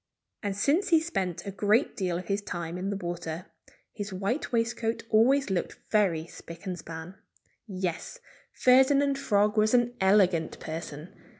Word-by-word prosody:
And 200 -1 -3
since 290 - +2
he 330 -3 +6
spent 195 - -3
a 200 - -4
great 210 +6 +2
deal 180 -3 -1
of 180 - -6
his 200 +3 -1
time 175 -3 -5
in 190 +2 -2
the 200 - -2
water, 175 -1 -5 0.5
his 205 -1 -5
white 195 +9 -2
waistcoat 230 -1 -1
always 245 +2 +4
looked 185 - -2
very 185 -7 +2
spick 170 +2 -11
and 185 -2 -3
span. 160 +4 -9 0.5
Yes! 185 - -4 0.3
Ferdinand 275 +2 +4
Frog 210 -3 +2
was 215 +3 +4
an 240 0 +2
elegant 190 -4 +3
person. 160 0 -7
200 Hz, 155 wpm, -28 LUFS, 175-235 Hz, 0.5 s, he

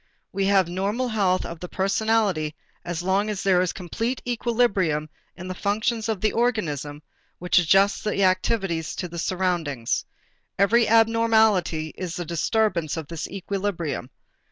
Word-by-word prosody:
We 195 0 -1
have 195 -3 +4
normal 200 +8 -1
health 195 -4 +1
of 170 - -7
the 180 - -7
personality 195 -5 0 0.3
as 175 0 -4
long 195 +3 +1
as 205 -2 -3
there 185 -2 +4
is 180 - 0
a - - -5
complete 225 +8 -3
equilibrium 210 -11 0 0.3
in 180 - -7
the 185 - -3
functions 220 +4 -1
of 215 -4 -2
the 215 - +2
organism 150 - -1 0.3
which 180 0 +3
adjusts 195 +4 +3
the 205 -2 0
activities 185 -3 0
to 180 - -4
the 170 0 -7
surroundings. 170 -10 -1 0.5
Every 220 +4 +4
abnormality 220 -8 +3
is 180 -2 -5
a 175 - -4
disturbance 170 0 0
of 160 -3 -6
this 165 -2 -4
equilibrium. 190 -8 -3
190 Hz, 150 wpm, -24 LUFS, 170-215 Hz, 0.5 s, have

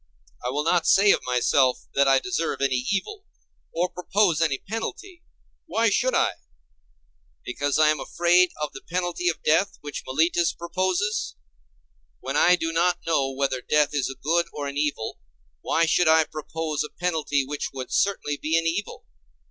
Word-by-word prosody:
I 125 - -2
will 145 +3 -1
not 170 +1 +1
say 200 +1 +6
of - - +3
myself 125 +1 +2
that 140 0 +3
I 135 0 +5
deserve 165 +2 -2
any 130 -2 0
evil, 395 - -3 0.5
or 175 +2 0
propose 180 -2 0
any 150 -5 +1
penalty. 335 - -6 0.5
Why 225 -1 +1
should 255 +5 +1
I? - - +3 1.1
Because 140 +3 -1
I 155 -1 +5
am 155 -1 +1
afraid 175 +3 +3
of 150 -1 -3
the 135 - -9
penalty 175 0 -2
of 160 - -4
death 165 +6 +2
which 145 -1 -6
Meletus 165 +5 +1
proposes? 185 - -2 0.8
When - - -5
I 180 - +5
do 165 -2 -3
not 175 +2 +2
know 145 -5 +1
whether 135 -1 -2
death 150 +1 +1
is 145 -3 0
a 135 - -7
good 170 +3 +1
or 145 - -5
an 140 - -6
evil, 145 -6 -2 0.4
why 165 - +1
should 165 +2 +2
I 160 0 +6
propose 155 0 -4
a 150 - -7
penalty 155 -5 -1
which 145 +2 -4
would 130 -2 -7
certainly 185 -7 0
be 160 +3 0
an 165 - 0
evil? 175 +6 -3
160 Hz, 170 wpm, -24 LUFS, 145-180 Hz, 1.1 s, say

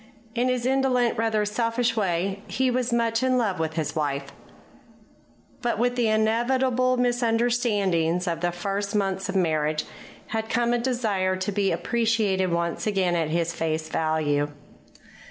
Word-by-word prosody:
In 245 +1 +1
his 250 -1 -1
indolent, 255 -2 +2
rather 220 -1 +1
selfish 230 +2 0
way, 195 -1 -1
he 260 -1 +1
was 250 0 0
much 230 -1 +1
in 255 0 +2
love 205 -8 0
with 160 0 -2
his 160 -1 -2
wife. 145 -3 -2 1.3
But 240 -2 0
with 245 +2 +1
the 240 -2 +2
inevitable 250 +4 +2
misunderstandings 225 -8 +1
of 165 -1 -1
the 175 0 +1
first 200 +4 -3
months 195 -1 -1
of 190 - -3
marriage 155 -4 +1 0.4
had 220 0 -3
come 240 0 +1
a 240 - +1
desire 220 -7 0
to 185 +2 -2
be 200 -1 +1
appreciated 205 0 +1
once 170 +4 -1
again 190 -4 +1
at 165 -2 0
his 170 +1 0
face 160 -1 -2
value. 155 -2 0
210 Hz, 150 wpm, -25 LUFS, 170-240 Hz, 1.3 s, indolent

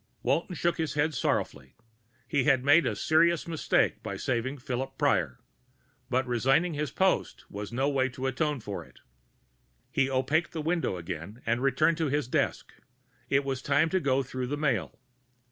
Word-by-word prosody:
Walton 170 +5 0
shook 170 +1 0
his 155 -4 -2
head 150 +2 +1
sorrowfully. 70 - -2 0.5
He 140 -4 +1
had 135 -3 +3
made 155 +4 +5
a - - -1
serious 165 +1 +2
mistake 165 -2 +1
by - - -5
saving 130 +3 -2
Philip 135 0 -4
Prior. 85 - +1 0.7
But 130 0 +1
resigning 135 +8 +2
his 150 -1 -2
post 190 +7 0
was 100 +1 -6
no 130 +4 0
way 135 -2 +1
to 130 +1 -6
atone 135 +1 -1
for 100 -2 -5
it. - - -20 0.9
He 135 - +1
opaqued 135 +6 0
the 160 - -3
window 165 - 0
again 90 +6 -7
and 120 +2 0
returned 155 +5 +2
to 160 -2 0
his 145 -2 0
desk. - - -1 0.6
It 135 +1 +3
was 135 -2 -2
time 140 +4 +2
to 185 - +1
go 135 -4 +1
through 130 0 -4
the 145 +3 -2
mail. 135 -9 -1
135 Hz, 170 wpm, -28 LUFS, 125-155 Hz, 0.9 s, made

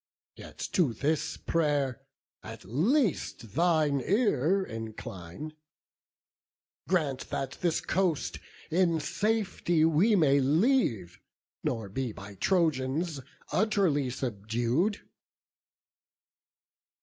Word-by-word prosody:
Yet - - -12
to 160 - +2
this 145 +7 -1
pray'r 145 -6 0 0.4
at - - -10
least 160 - 0
thine 155 -4 +2
ear 195 - +2
incline; 110 - -7 1.4
Grant 150 -8 0
that 135 0 -4
this 170 -3 +1
coast 180 -5 0 0.3
in 170 -1 +3
safety 185 -3 +1
we 170 +8 +4
may 140 -6 +4
leave, 140 - +1 0.4
Nor 115 -4 -2
be 125 +2 -3
by 100 0 -10
Trojans 155 - 0 0.3
utterly 185 - +2
subdued." 120 - -1
150 Hz, 85 wpm, -29 LUFS, 125-180 Hz, 1.4 s, we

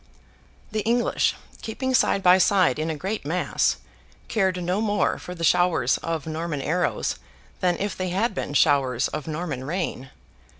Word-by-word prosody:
The 215 - -1
English, 235 +3 +1 0.3
keeping 260 +4 -3
side 200 -5 +3
by 180 0 +6
side 185 -7 +3
in 155 +1 -1
a 160 - -2
great 195 +7 -3
mass, 170 +5 0 0.5
cared 190 -4 0
no 180 +4 0
more 210 -2 +1
for 180 - -8
the 165 - -6
showers 165 -7 +3
of 165 -3 -3
Norman 160 -1 -3
arrows 175 +4 0 0.4
than 180 -2 +1
if 205 0 -2
they 185 -1 -3
had 200 +6 0
been 145 - -4
showers 135 -5 +3
of 155 -1 -5
Norman 155 -4 -4
rain. 150 -4 -3
180 Hz, 160 wpm, -24 LUFS, 155-195 Hz, 0.5 s, by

